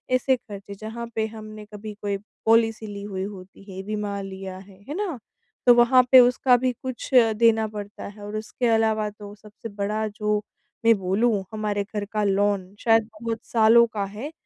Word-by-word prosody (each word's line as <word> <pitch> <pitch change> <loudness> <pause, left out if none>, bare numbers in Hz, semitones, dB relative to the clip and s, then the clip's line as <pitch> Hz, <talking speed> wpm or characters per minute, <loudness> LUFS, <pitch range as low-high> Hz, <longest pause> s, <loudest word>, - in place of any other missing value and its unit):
ऐसे 260 +1 +2
खर्चे 200 -4 -10
जहाँ 225 +3 -7
पे 220 0 +1
हमने 215 -1 -10
कभी 210 +1 -7
कोई 200 -1 -1 0.3
पॉलिसी 225 -1 +3
ली 200 -1 -7
हुई 190 -2 -4
होती 195 -1 -9
है, 190 +1 -6
बीमा 205 -1 -3
लिया 190 -1 -7
है, 190 0 -15
है - - -3
ना? 375 -9 -3 0.5
तो 245 - +8
वहाँ 250 +1 +6
पे 260 - +10
उसका 250 0 +5
भी 255 +1 0
कुछ 260 +1 -6
अ, 230 -3 +6
देना 220 0 +3
पड़ता 210 -1 -8
है 205 +1 -12
और 210 +1 -6
उसके 225 +3 -2
अलावा 220 -1 +1
तो 205 0 -11
सबसे 215 +3 -11
बड़ा 210 +2 -2
जो 210 0 -1 0.5
मैं 230 -1 +7
बोलूँ 200 +2 +1
हमारे 210 -1 -1
घर 205 0 -5
का 210 -1 +1
लोन 200 -1 +1
शायद 225 -1 +3
बहुत 230 -1 -3
सालों 230 +1 +5
का 205 -2 -1
है 215 +10 -7
215 Hz, 185 wpm, -24 LUFS, 205-230 Hz, 0.5 s, पे